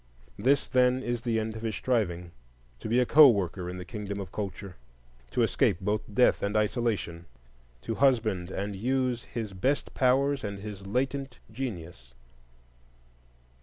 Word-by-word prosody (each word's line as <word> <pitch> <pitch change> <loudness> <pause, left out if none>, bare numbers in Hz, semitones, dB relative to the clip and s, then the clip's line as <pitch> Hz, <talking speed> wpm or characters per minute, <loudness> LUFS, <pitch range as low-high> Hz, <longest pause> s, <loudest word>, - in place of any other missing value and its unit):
This, 135 +6 +2
then, 125 0 +3
is 120 -1 -2
the 115 -2 0
end 110 0 -3
of 110 - -7
his 110 -3 -2
striving: 90 -9 -1 0.5
to - - -6
be 120 +3 +3
a 125 - +3
co 150 +2 +8
worker 90 -4 -1
in 90 - -6
the 90 - -7
kingdom 100 -1 -5
of 95 -2 -7
culture, 100 -2 -6 0.5
to - - +1
escape - - +2
both 105 +2 -1
death 125 +5 +3
and 100 +2 0
isolation, 105 -6 -1 0.6
to 115 - -2
husband 110 -9 +2
and 100 +2 -4
use 125 +2 -1
his 110 -4 -5
best 130 +10 -1
powers 135 +2 +2
and 100 -1 -4
his 100 -1 -8
latent 135 +3 -2
genius. 85 - -7
110 Hz, 155 wpm, -28 LUFS, 95-125 Hz, 0.6 s, co